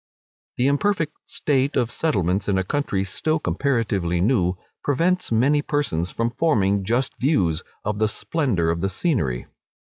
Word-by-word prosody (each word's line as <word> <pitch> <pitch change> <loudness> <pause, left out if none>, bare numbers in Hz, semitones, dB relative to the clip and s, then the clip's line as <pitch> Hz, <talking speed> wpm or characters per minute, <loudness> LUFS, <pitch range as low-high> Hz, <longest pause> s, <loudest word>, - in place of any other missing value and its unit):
The 125 - +2
imperfect 160 +4 +1 0.2
state 140 -1 0
of 120 -1 +1
settlements 100 - 0
in 95 - +2
a 95 - +1
country 100 -4 -1
still 155 +11 -1
comparatively 110 - 0
new, 90 -3 +2 0.3
prevents 170 +5 +1
many 135 +6 +3
persons 135 - -1
from 115 0 -1
forming 100 -10 +2
just 120 +6 -1
views 95 - +2 0.2
of 105 0 -2
the 110 - +3
splendour 110 - 0
of 85 0 -2
the 95 - 0
scenery. 95 - -1
115 Hz, 145 wpm, -23 LUFS, 95-145 Hz, 0.3 s, many